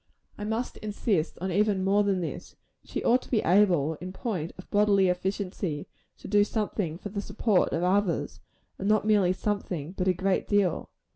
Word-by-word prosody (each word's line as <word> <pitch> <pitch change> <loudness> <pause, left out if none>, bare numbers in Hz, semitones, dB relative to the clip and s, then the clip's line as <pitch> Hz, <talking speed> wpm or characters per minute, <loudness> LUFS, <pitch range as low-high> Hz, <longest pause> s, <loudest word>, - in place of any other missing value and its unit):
I 210 - -6
must 225 +3 -2
insist 205 -5 -1
on 190 0 -2
even 200 0 +2
more 200 +2 +3
than 195 -2 +1
this. 165 - -6 0.3
She - - -5
ought 250 +2 +4
to - - -15
be 225 - +2
able, 175 -5 +3
in 185 +1 -5
point 185 -6 -3
of 185 - -11
bodily 200 -2 +4
efficiency, 180 -3 -2 0.3
to - - -10
do 205 +1 +4
something 205 -6 -2
for 205 - -7
the 200 0 -3
support 205 -1 +1
of 165 - -1
others; 180 -5 0 0.4
and 195 - -1
not 215 0 +3
merely 205 -4 +4
something, 185 -6 -3
but 185 -1 -2
a 185 - +4
great 190 +2 0
deal. 200 -4 +1
195 Hz, 185 wpm, -27 LUFS, 180-210 Hz, 0.4 s, ought